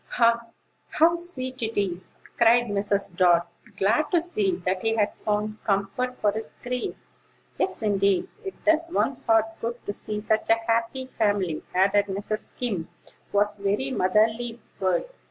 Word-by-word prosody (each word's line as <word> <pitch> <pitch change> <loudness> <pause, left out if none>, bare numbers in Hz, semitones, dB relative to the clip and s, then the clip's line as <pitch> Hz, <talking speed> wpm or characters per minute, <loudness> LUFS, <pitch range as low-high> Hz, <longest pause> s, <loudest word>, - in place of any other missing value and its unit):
"Ah, 235 0 +3 0.5
how 335 +2 +5
sweet 260 -8 -5
it 225 -1 -1
is!" 185 -2 -3 0.2
cried 235 +1 +5
Mrs. 200 -3 0
Dart, 175 -1 +4 0.3
glad 220 +10 +2
to 350 - +4
see 215 - 0
that 185 0 0
he 225 0 +1
had 210 -2 +1
found 215 0 -2
comfort 200 +6 0
for 210 - +1
his 220 +2 -5
grief. 250 0 -3 0.6
"Yes; 375 -11 -1
indeed: 200 -2 +2 0.2
it 385 - -8
does 325 +1 +3
one's 275 -6 0
heart 225 -2 +4 0.2
good 235 +1 -2
to 205 - -2
see 210 +1 -4
such 215 +1 0
a 225 - +6
happy 230 +3 0
family," 205 -9 0
added 200 +2 +4
Mrs. 205 +2 -3
Skim, 200 -10 -3 0.4
who - - -1
was 205 0 +2
a - - -14
very 205 +7 0
motherly 225 +3 +1 0.2
bird. 185 - +1
215 Hz, 160 wpm, -25 LUFS, 200-240 Hz, 0.6 s, a